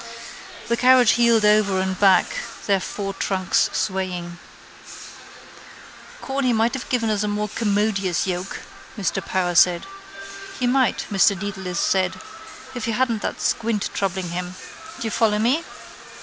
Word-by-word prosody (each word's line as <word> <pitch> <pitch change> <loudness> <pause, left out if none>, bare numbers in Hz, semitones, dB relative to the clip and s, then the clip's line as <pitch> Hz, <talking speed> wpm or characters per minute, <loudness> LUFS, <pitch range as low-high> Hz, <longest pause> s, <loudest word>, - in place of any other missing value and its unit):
The 235 - 0
carriage 250 -1 +6
heeled 235 -2 +3
over 210 -2 +3
and 190 0 -2
back, 190 -3 +5 0.4
their 200 -2 +2
four 195 +1 -5
trunks 190 -2 0
swaying. 180 -2 -3 1.8
—Corny 270 -2 0
might 225 +1 +1
have 265 - -5
given 230 -3 0
us 210 -2 0
a 210 - -1
more 210 0 -1
commodious 205 -4 0
yoke, 180 0 -4 0.4
Mr 195 -1 -2
Power 180 -1 -1
said. 175 0 +4 0.7
—He 250 - 0
might, 255 +1 +1
Mr 200 0 +3
Dedalus 190 -3 -4
said, 185 -1 +1 0.6
if 245 -3 -4
he 230 - -1
hadn't 230 -2 0
that - - -4
squint 220 -3 -1
troubling 190 -2 -2
him. 180 +1 -5 0.4
Do - - -5
you 225 - -2
follow 215 -2 +2
me? 250 +10 +1
205 Hz, 140 wpm, -22 LUFS, 185-230 Hz, 1.8 s, carriage